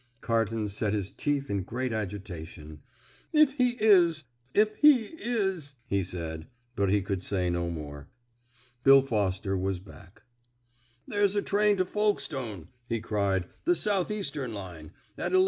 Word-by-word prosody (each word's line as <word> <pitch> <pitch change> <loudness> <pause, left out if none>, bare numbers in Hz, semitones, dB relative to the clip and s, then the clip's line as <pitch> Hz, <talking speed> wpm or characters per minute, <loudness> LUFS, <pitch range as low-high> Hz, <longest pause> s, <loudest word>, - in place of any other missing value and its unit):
Carton 115 -2 0
set 105 +1 -1
his 100 -3 -2
teeth 145 -1 -1
in 100 -4 -1
great 120 +6 -3
agitation. 90 -7 -6 0.5
"If 305 -3 +5
he 250 -1 +2
is! 175 -7 +5 0.3
if 215 +5 +3
he 295 -5 +7 0.2
is!" 190 - -1
he 100 -5 0
said; 80 -3 -6 0.3
but 100 -2 +1
he 100 0 +2
could 95 -1 -2
say 90 -2 -1
no 85 0 -1
more. 75 -4 -7 0.7
Bill 135 0 +8
Foster 100 -5 -1
was 95 0 -1
back. 95 0 -16 0.8
"There's 205 -1 +2
a 205 - +2
train 205 0 +3
to 185 - +2
Folkestone," 135 - -1 0.2
he 115 -1 0
cried, 100 -4 0 0.2
"the 355 - +4
South 200 - +1
Eastern 150 - -3
line, 90 -6 -8 0.3
at - - -2
11.47. 375 - +6
110 Hz, 145 wpm, -28 LUFS, -, 0.8 s, Bill